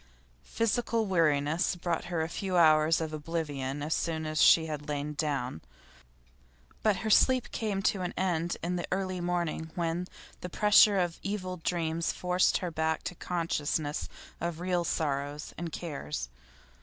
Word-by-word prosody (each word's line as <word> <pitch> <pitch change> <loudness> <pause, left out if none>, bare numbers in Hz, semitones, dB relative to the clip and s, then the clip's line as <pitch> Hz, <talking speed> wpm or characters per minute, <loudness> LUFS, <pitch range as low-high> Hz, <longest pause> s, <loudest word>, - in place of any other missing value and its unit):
Physical 230 0 0
weariness 160 -3 +2
brought 175 -1 -2
her 175 -2 -1
a - - -2
few 185 +1 -2
hours 155 -1 +5
of 160 -1 -3
oblivion 145 -3 -3
as 155 +2 0
soon 160 -2 -1
as 155 0 0
she 160 - +7
had 150 -2 -5
lain 145 0 -2
down, 140 - -2 1.2
but 215 -2 +3
her 215 - +1
sleep 255 +2 +4
came 205 -3 -2
to 195 - +1
an 180 - -2
end 175 -2 0
in 180 +1 -1
the 175 - -3
early 185 -1 -1
morning, 175 -2 -2
when 170 0 -1 0.3
the 180 - -6
pressure 210 +1 +6
of 175 -2 0
evil 185 -2 -3
dreams 165 -1 -1
forced 180 0 +2
her 180 -2 -4
back 160 0 -1
to - - -4
consciousness 160 -4 -2 0.3
of 170 -1 -3
real 180 -1 0
sorrows 145 -2 -2
and 170 0 -5
cares. 75 - -5
170 Hz, 155 wpm, -30 LUFS, 155-180 Hz, 1.2 s, she